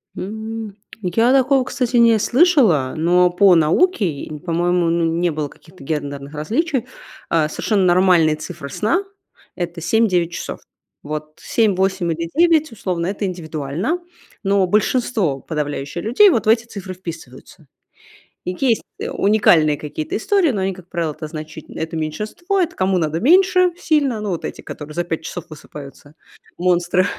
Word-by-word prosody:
М, 220 +1 -6 0.3
я 225 +7 +2
такого, 270 0 +3
кстати, 250 -1 -1
не 230 -1 +6
слышала, 240 - +3
но 175 +3 +3
по 180 0 +5
науке, 170 - +2 0.2
по-моему, 175 0 +1
ну 170 0 +1
не 170 +2 +1
было 150 -1 -3
каких-то 160 +1 -17
гендерных 145 -1 -4
различий, 250 - -1 0.4
а 155 -2 +2
совершенно 195 +2 0
нормальные 175 -3 +4
цифры 155 -2 -8
сна- 225 - 0 0.5
это 175 -1 -4
7-9 180 -5 +2
часов. - - -6 0.4
Вот 155 +1 -6
7, 220 -4 +1
8 190 -2 0
или 165 +1 -3
9 320 -4 +3
условно- 180 -6 -3
это 200 +1 -2
индивидуально, 170 - -3 0.4
но 195 -1 +2
большинство 210 - +1
подавляющее 145 +1 -4
людей 265 - +5
вот 235 -8 +1
в - - +4
эти 230 +1 +3
цифры 200 -4 -7
вписываются. 160 -3 -10 0.8
И 180 - -3
есть 245 -5 +2 0.2
уникальные 175 -7 +3
какие-то 155 0 -5
истории, 380 - +2
но 200 -5 -2
они, 190 0 -1
как 180 -1 -14
правило, 170 -3 -2
это 155 +1 -7
значите 155 0 -9
это 160 0 -4
меньшинство, 215 - -2
это 345 0 -1
кому 185 0 +1
надо 160 -1 -1
меньше 365 - +4
сильно. 280 -11 +1
Ну 210 - -3
вот 175 - -3
эти, - - -6
которые 150 0 -9
за 175 - -1
5 165 -1 -4
часов 175 -2 -6
высыпаются- 145 -1 -12 0.4
монстры. 180 0 +2
180 Hz, 150 wpm, -20 LUFS, 160-225 Hz, 0.8 s, не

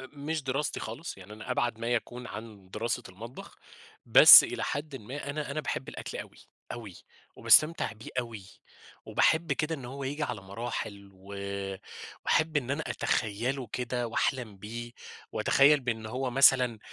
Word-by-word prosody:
آآ، 130 - -9
مش 150 +2 -4
دراستي 135 +3 -2
خالص، 115 +7 -6
يعني 95 +3 -12
أنا 105 +4 -9
أبعد 120 -2 0
ما 115 +1 -3
يكون 120 +1 -2
عن 110 -5 -10
دراسة 115 +4 -2
المطبخ، 115 +7 -11 0.5
بس - - +11
إلى - - -4
حدٍّ 145 0 -4
ما 135 +5 -6
أنا 150 -1 -4
أنا 145 +2 -2
باحِب 135 -3 -4
الأكل - - -7
أوي، - - -9 0.3
أوي، 105 -7 -8 0.4
وباستمتِع 155 -5 +4
بيه 115 +6 -11
أوي، 115 -5 -4 0.6
وباحِب 160 +1 +2
كده 160 +1 -1
إن 135 -5 -9
هو 135 +3 -6
ييجي 145 +3 -3
على 120 -7 -3
مراحل، 100 -1 -6
وآآ، 100 0 -6 0.5
وأحِب 160 -1 +2
إن 135 -3 -1
أنا 145 +3 -1
أتخيَّله 120 +4 -1
كده 125 -1 -2
وأحلَم 115 -2 -1
بيه، 115 +4 -7 0.4
وأتخيَّل 145 +1 +4
بأن 115 -3 -3
هو 125 +3 -3
مثلًا 125 -3 +5
120 Hz, 155 wpm, -29 LUFS, 110-140 Hz, 0.6 s, بس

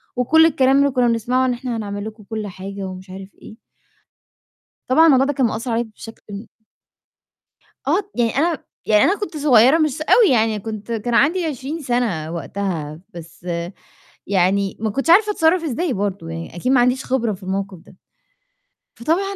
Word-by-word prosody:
وكلّ 320 +6 +4
الكلام 270 -3 +3
اللي 280 -1 +3
كنا 250 -2 +2
بنسمعه 245 +3 +1
إن 250 - +1
إحنا 240 -1 -4
هنعمل 205 -1 -5
لكم 215 -1 -9
كلّ 215 0 -5
حاجة 195 +1 -7
ومش 185 0 -10
عارف 190 +1 -9
إيه - - -12 1.3
طبعًا 310 +6 +5
الموضوع 270 -4 +5
ده 290 - -1
كان 265 -2 +1
مأثّر 230 +2 -3
عليَّ 230 +1 +1
بشكل 225 0 -13
ن 200 +2 -8 1.4
آه، 350 +8 +2
يعني 235 -1 0
أنا 325 -1 0 0.2
يعني 210 -1 +4
أنا 395 +3 +2
كنت 360 -7 -5
صغيّرة 265 0 +5
مش 305 -2 0
أوي 420 +6 +5
يعني، 220 -2 +1
كنت 215 +1 -7
كان 230 +1 -2
عندي 330 +8 +3
20 300 +2 -4
سنة 230 - -1
وقتها، 165 -2 -4
بس 170 +1 -12 0.8
يعني 195 0 +1
ما 220 - -1
كنتش 275 +9 -3
عارفة 420 +4 +6
أتصرّف 330 -1 +2
إزاي 310 +1 -2
برضو 195 -4 -3
يعني، 165 0 -7
أكيد 250 +9 -1
ما 260 - +4
عنديش 250 +2 +1
خبرة 235 -4 0
في 190 0 -11
الموقف 195 0 -4
ده. 180 - -19 1.0
فطبعًا 375 +10 -1
235 Hz, 170 wpm, -20 LUFS, 200-280 Hz, 1.4 s, عارفة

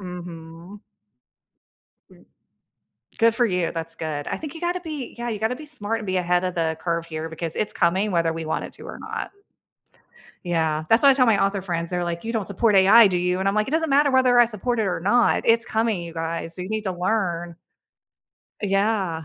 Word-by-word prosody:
Mhm. 175 +1 -9 2.4
Good 230 0 +4
for 240 0 +3
you, 180 -5 -1
that's 165 0 -4
good. 155 -3 -5
I - - -3
think 305 -1 -8
you 325 - -9
gotta 350 +1 -1
be 305 -7 -7
yeah, 240 0 -4
you 215 - -3
gotta 220 +4 -1
be 305 - -10
smart 225 -7 -2
and 215 - -7
be 185 -1 0
ahead 180 0 +1
of 180 -1 -2
the 160 -1 -1
curve 170 -1 -2
here, 160 0 -6
because 160 0 -4
it's 210 - 0
coming 190 +5 +1
whether 170 -2 +1
we 165 0 -5
want 160 - -2
it - - -9
to - - -13
or - - -8
not. - - -5 1.1
Yeah. 160 -3 0
That's 225 - +4
what 280 - +7
I - - +5
tell 255 -2 +3
my 210 -4 +3
author 195 -1 -1
friends, 170 -3 -3
they're 180 -1 -1
like, 170 +3 -4
"You 230 - -3
don't 220 -5 -2
support 210 +2 +1
AI, 200 +3 +7
do 185 - -1
you?" 180 +1 0
And 195 - +1
I'm 195 - 0
like, 215 0 0
"It - - -3
doesn't 320 -1 +1
matter 285 +1 +4
whether 255 -2 +4
I 240 - +8
support 235 +2 -2
it 220 - +1
or 185 - -2
not, 225 +7 +2
it's 230 0 +4
coming, 220 -4 -1
you 170 -1 -8
guys, 165 0 -2
so 180 - +1
you 185 - -7
need 215 0 -2
to 190 - -1
learn." 175 -3 -2 1.1
Yeah. 195 -5 0
190 Hz, 220 wpm, -23 LUFS, 170-230 Hz, 2.4 s, I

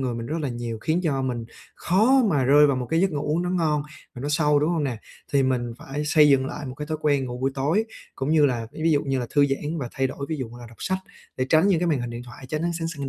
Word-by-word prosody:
người 125 -2 -1
mình 115 0 -5
rất 155 +5 -2
là 145 - -2
nhiều, 120 -2 -4
khiến 160 +9 0
cho 140 -6 0
mình 120 -3 -2 0.3
khó 235 +9 +3
mà 140 -5 +2
rơi 145 +3 +6
vào 140 - +1
một 125 -1 -3
cái 165 - +2
giấc 190 +1 +2
ngủ 145 -2 -3
uống 170 +2 +1
nó 180 - -2
ngon 155 -5 +1 0.3
và 125 - -8
nó 145 - -3
sâu, 150 -1 +3
đúng 150 +4 +1
hông 160 -4 0
nè? 125 -4 -2 0.4
Thì 140 -1 +4
mình 125 -2 0
phải 145 +2 -5
xây 150 0 +5
dựng 135 -1 +4
lại 145 0 -6
một 130 - -6
cái 150 +2 -6
thói 155 -1 -3
quen 145 -3 +2
ngủ 125 0 -6
buổi 135 +2 0
tối, 155 +11 +1 0.3
cũng 135 +3 -2
như 155 -2 +5
là, 120 -4 -2
ví - - -9
ví 165 - +3
dụ 145 -2 +3
như 135 -1 0
là 125 - -2
thư 145 -1 +5
giãn 150 +4 -2
và 125 - -4
thay 135 0 0
đổi, 140 +1 -6
ví 160 - -2
dụ 130 -4 -4
là 120 - -9
đọc 115 - -16
sách 190 0 -1 0.4
để 130 - -1
tránh 160 +5 +4
những 175 -4 +3
cái 175 - +1
màn 150 -6 +1
hình 120 -1 -4
điện 120 +1 -6
thoại, 130 +2 -12
tránh 155 +2 -2
ánh 170 0 0
sáng 165 - -2
xanh 140 -4 -5
145 Hz, 310 wpm, -24 LUFS, 130-155 Hz, 0.4 s, rơi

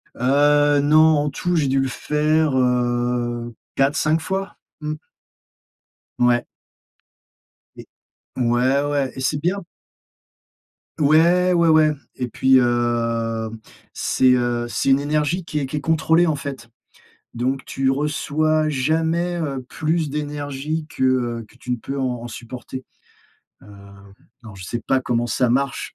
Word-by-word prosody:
Heu, 145 +2 +3
non, 155 +2 +5
en - - 0
tout 175 +5 -2
j'ai 155 -4 +2
dû 135 +1 +1
le 135 - +1
faire, 150 +3 0
heu, 120 -1 0 0.2
4-5 155 +3 +2
fois. 195 +3 -4 0.2
Mmh. 150 0 -3 1.3
Ouais. 120 0 +3 1.3
Et - - -11 0.5
ouais, 125 +3 +2
ouais 145 -3 -1
et - - -7
c'est 140 +3 0
bien 185 +5 -1 1.4
Ouais. 170 +5 +4
Ouais, 170 -1 +3
ouais 155 -1 +5 0.2
et 125 - -3
puis, 130 +3 +3
hem, 115 -2 0 0.3
c'est, 130 -1 +2
heu, 120 -1 0
c'est 120 - -1
une 135 +1 +5
énergie 150 +5 -1
qui 150 -1 -3
est 140 - -2
qui 135 - -5
est 150 - -3
contrôlée 160 +3 +3
en 160 -3 +1
fait. 135 -4 -7 0.7
Donc 130 +3 -2
tu 135 0 -1
reçois 155 +2 0
jamais, 160 +5 0
heu, 140 -6 -3
plus 160 -1 -1
d'énergie 150 +1 -4
que, 130 - -2
heu, 120 -3 0
que - - -21
tu 125 - -9
ne 125 - +1
peux 135 +4 -6
en 125 -3 -2
en - - -6
supporter. 125 +3 -8 0.8
Hem, 100 0 -15 0.3
alors 110 -5 -12
je 95 - -10
sais 120 +6 -4
pas 135 +2 +1
comment 120 -1 -1
ça 120 +2 +1
marche, 140 +2 -1
135 Hz, 140 wpm, -21 LUFS, 120-155 Hz, 1.4 s, non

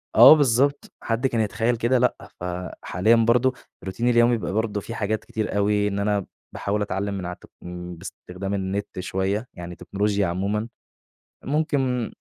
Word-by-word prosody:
آه - - +11
بالضبط، 140 0 +2
حد 115 +3 0
كان 115 -3 0
يتخيّل 115 +3 0
كده 120 +3 +2
لأ، 125 +1 +2 0.2
ف - - -9 0.4
حاليًا 110 +7 +3
برضه 120 +3 +3 0.3
روتيني 115 +6 -1
اليومي 120 0 +5
بيبقي 100 - -4
برضه 110 -1 0
في 115 - -7
حاجات 110 0 -1
كتير 110 -2 -3
أوي، 105 0 +2
إن 100 0 -2
أنا 100 -2 0 0.3
باحاول 105 +1 -2
أتعلّم 100 0 -2
من 95 -2 -4
عالت 90 0 -7 0.2
إمم 90 0 -7
بإستخدام 95 +2 -7
النت 95 0 -3
شوية، 95 +5 -1
يعني 90 0 -8
تكنولوجيا 100 0 0
عمومًا، 100 +5 -1 0.8
ممكن 135 -5 0
105 Hz, 155 wpm, -24 LUFS, 95-120 Hz, 0.8 s, آه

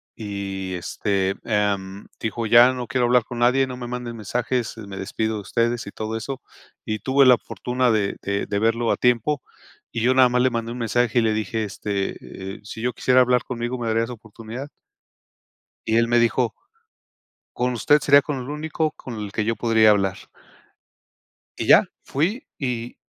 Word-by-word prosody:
Y, 100 -3 -5
este, 95 +2 -1
em 100 -3 -1
dijo: 110 0 -3
"Ya 120 +3 +7
no 125 -2 -5
quiero 125 -2 +1
hablar 125 -1 +4
con 120 +1 -8
nadie, 125 +3 +3
no 125 -1 -6
me 125 - -6
manden 120 -1 -5
mensajes, 120 +2 -2
me 100 -3 -8
despido 110 +3 -2
de 105 - -4
ustedes", 115 +4 -1
y 100 - -8
todo 110 +1 -4
eso. 135 +4 -6 0.4
Y 110 0 -2
tuve 135 +3 +3
la 125 -2 +7
fortuna 125 +1 -1
de 105 -3 0
de 100 0 -2
de 100 - -1
verlo 115 +1 +1
a - - 0
tiempo 125 +4 +1 0.5
y 115 - -3
yo 125 +3 +3
nada 130 -1 +7
más 125 0 +2
le 130 - +4
mandé 115 -1 -3
un 125 - -6
mensaje 120 +1 +1
y - - +3
le 110 -1 +2
dije: 110 +1 -2
"Este, 95 -3 -5
eh, - - -14
si 110 +1 -8
yo 125 +1 -1
quisiera 130 +2 +4
hablar 125 -1 +3
conmigo, 120 0 -4
¿me 120 -2 -4
darías 115 +1 0
oportunidad?" 115 +3 -8 1.2
Y 110 - +2
él 115 0 +3
me 120 0 +4
dijo. 120 0 +2 1.0
Con 125 0 0
usted 145 +5 +3
sería 140 0 +6
con 145 -1 -4
el 130 +2 -6
único 155 +1 -2
con 130 -5 -9
el 105 -2 -5
que 105 +1 -1
yo 115 +2 0
podría 110 -2 +4
hablar. 95 -2 +2 1.4
Y - - -2
ya, - - +8 0.2
fui 195 - -2
y, 120 -3 -4
115 Hz, 185 wpm, -23 LUFS, 110-125 Hz, 1.4 s, ya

